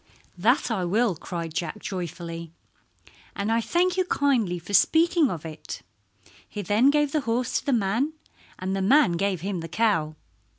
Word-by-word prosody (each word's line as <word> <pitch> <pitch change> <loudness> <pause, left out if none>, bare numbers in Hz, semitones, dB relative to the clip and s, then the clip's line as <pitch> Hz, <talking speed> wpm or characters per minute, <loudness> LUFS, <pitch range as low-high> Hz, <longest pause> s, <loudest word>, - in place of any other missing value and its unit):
"That 235 +8 +2
I 195 -5 0
will," 205 +3 +1
cried 165 0 -6
Jack 170 +5 -3
joyfully, 170 -4 -6 0.8
"and 200 +2 -1
I 230 +1 +2
thank 355 +8 +1
you 370 - +2
kindly 250 - +1
for 175 +4 -9
speaking 325 - +4
of 165 -5 -5
it." 155 -1 -8 0.7
He 205 - -5
then 215 +8 +4
gave 295 -1 +2
the 305 - +1
horse 240 0 0
to - - -16
the - - +3
man, 235 +6 +1 0.4
and 190 +1 -3
the 195 - -1
man 270 +3 +5
gave 185 0 -1
him 195 0 -3
the 165 0 -7
cow. 165 -7 +1
205 Hz, 170 wpm, -25 LUFS, 175-265 Hz, 0.8 s, man